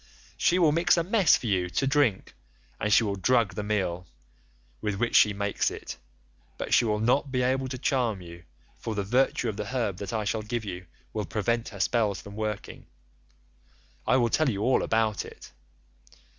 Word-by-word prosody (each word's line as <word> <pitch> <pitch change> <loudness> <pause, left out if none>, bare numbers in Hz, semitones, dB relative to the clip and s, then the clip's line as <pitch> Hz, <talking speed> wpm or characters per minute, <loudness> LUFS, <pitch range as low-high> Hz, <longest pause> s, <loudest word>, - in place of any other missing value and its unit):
She 180 - +2
will 165 -4 +4
mix 170 +3 +3
a 170 - +2
mess 190 -2 +4
for - - -9
you 95 -5 0
to 135 - 0
drink, 135 -8 +1 0.5
and 105 - -1
she 110 - +6
will 100 -2 -2
drug 115 +1 +2
the - - -3
meal 95 -4 -2 0.7
with 105 -2 -1
which 120 +4 -1
she 105 - +6
makes 100 0 -1
it, - - -8 0.6
but - - -3
she 120 - +5
will 105 -1 +1
not 125 +5 +1
be 125 -1 +1
able 130 +1 0
to 130 0 -5
charm 120 -5 0
you, 85 -1 -12 0.3
for 110 - -4
the 100 - -1
virtue 125 +3 +1
of 105 -3 -3
the 105 - -3
herb 115 -6 -2
that 100 -1 -5
I 110 -2 -1
shall 110 +1 -1
give 110 +1 -4
you 90 -2 -7 0.3
will 105 -1 -2
prevent 115 +3 -1
her 100 - -11
spells 105 -1 +1
from 100 0 -11
working. 110 -1 -5 1.2
I 125 +4 +4
will 120 -2 +2
tell 155 +4 +2
you 100 -3 -2
all 130 +2 +3
about 110 -2 0
it. - - -12
110 Hz, 195 wpm, -27 LUFS, 100-125 Hz, 1.2 s, she